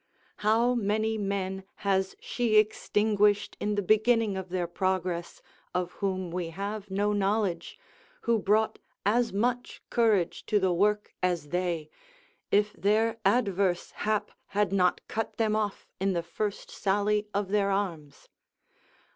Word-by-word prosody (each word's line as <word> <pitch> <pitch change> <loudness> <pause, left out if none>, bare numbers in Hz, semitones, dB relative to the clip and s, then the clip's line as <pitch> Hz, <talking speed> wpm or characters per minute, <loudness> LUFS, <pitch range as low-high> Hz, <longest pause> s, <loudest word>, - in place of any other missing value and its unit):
How 225 +4 +3
many 220 -1 0
men 190 -1 -2 0.2
has 190 -1 +1
she 235 -3 -1
extinguished 210 -1 +2
in 210 0 -1
the 205 - 0
beginning 220 +1 +3
of 190 -1 -5
their 180 -1 -1
progress, 180 -1 -2 0.3
of 180 -1 -1
whom 185 -3 -2
we 175 -1 -3
have 200 +4 -5
no 205 +2 +1
knowledge, 200 - 0 0.4
who 235 - +2
brought 215 +2 +2 0.3
as 230 +3 +2
much 245 +5 -1
courage 215 -7 +2
to 210 - +3
the 190 -2 +2
work 210 +3 +1
as 175 -5 0
they, 175 -2 -1 0.6
if 210 +1 +2
their 220 +5 +1
adverse 195 -6 +1
hap 215 -1 -1 0.3
had 205 -2 +2
not 180 -2 +2
cut 225 0 -3
them 220 -2 +2
off 210 -2 -2
in 195 0 +1
the 170 -1 -1
first 200 +5 -4
sally 205 +1 +1
of 200 -1 -1
their 200 -1 +2
arms? 170 -8 -3
200 Hz, 140 wpm, -28 LUFS, 185-215 Hz, 0.6 s, How